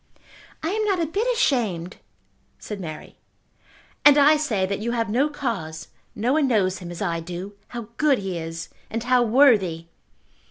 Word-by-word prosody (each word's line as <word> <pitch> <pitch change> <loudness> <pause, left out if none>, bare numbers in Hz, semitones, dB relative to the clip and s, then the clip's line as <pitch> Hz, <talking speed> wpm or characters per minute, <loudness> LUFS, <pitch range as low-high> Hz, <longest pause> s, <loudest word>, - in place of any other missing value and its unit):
"I 320 - 0
am 435 +2 0
not 390 -3 +1
a 335 - +1
bit 400 +10 -1
ashamed," 215 - 0 0.6
said 210 -2 -7
Mary. 155 -4 -8 0.9
"And 290 0 +8
I 295 +2 +6
say 230 -11 0
that 200 +1 -3
you 235 +3 -2
have 230 -3 -1
no 270 +7 +2
cause. 185 - -4 0.3
No 235 +5 0
one 300 -2 +3
knows 195 -6 +1
him 175 -2 -8
as 175 +3 -5
I 170 -3 -1
do. 180 +4 -7
How 235 -3 -7
good 290 -3 +3
he 195 -3 -4
is, 165 +1 -6 0.2
and 225 0 -3
how 250 0 +3
worthy!" 220 - +4
220 Hz, 170 wpm, -23 LUFS, 180-280 Hz, 0.9 s, And